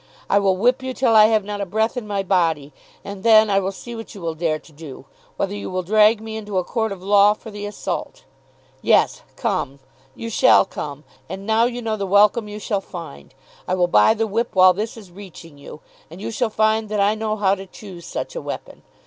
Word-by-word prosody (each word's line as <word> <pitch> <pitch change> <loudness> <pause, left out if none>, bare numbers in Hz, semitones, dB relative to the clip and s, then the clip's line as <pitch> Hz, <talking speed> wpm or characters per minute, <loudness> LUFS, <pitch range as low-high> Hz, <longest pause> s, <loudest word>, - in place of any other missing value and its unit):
I 200 - +5
will 195 -2 +1
whip 245 +6 +2
you 260 -1 -5
till 235 -4 +2
I 215 -1 +8
have 220 -2 +2
not 205 0 -5
a - - -1
breath 220 +6 0
in 245 -4 -5
my 200 -1 -2
body. 165 -7 0 0.3
And 200 -1 -7
then 220 -1 +5
I 195 - +3
will 195 0 -2
see 235 +4 -9
what 225 -1 -9
you 200 - -10
will 165 -1 -3
dare 160 -1 -1
to 155 - -19
do; 150 -3 -11 0.3
whether 195 0 -2
you 205 - -6
will 185 0 -3
drag 215 +3 +4
me 220 0 -7
into 210 -3 -5
a 185 - +1
court 220 +2 -2
of 190 -2 -8
law 205 +1 +5
for 220 - -12
the 205 0 -6
assault. 355 - -5 0.6
Yes; - - +2
come. 185 - -2 0.4
You 230 0 -6
shall 255 -2 +5
come. 145 -5 -7 0.3
And 190 +2 -7
now 220 +2 +3
you 245 0 -3
know 220 -1 -2
the 200 -1 -3
welcome 210 +3 +4
you 210 0 -7
shall 205 -1 -2
find. 70 - -10 0.3
I 185 - 0
will 180 -1 +2
buy 175 - +4
the 225 0 0
whip 220 +2 -2
while 185 0 +7
this 215 +5 -4
is 200 -5 -13
reaching 175 -5 -13
you, 145 +2 -11 0.3
and 170 +3 -11
you 210 - -5
shall 230 +1 -1
find 220 0 +1
that 210 -1 -2
I 200 +1 +3
know 215 0 -2
how 200 -2 +2
to 195 0 -6
choose 185 -3 -11
such - - -5
a - - -4
weapon. - - -7
205 Hz, 235 wpm, -21 LUFS, 185-220 Hz, 0.6 s, I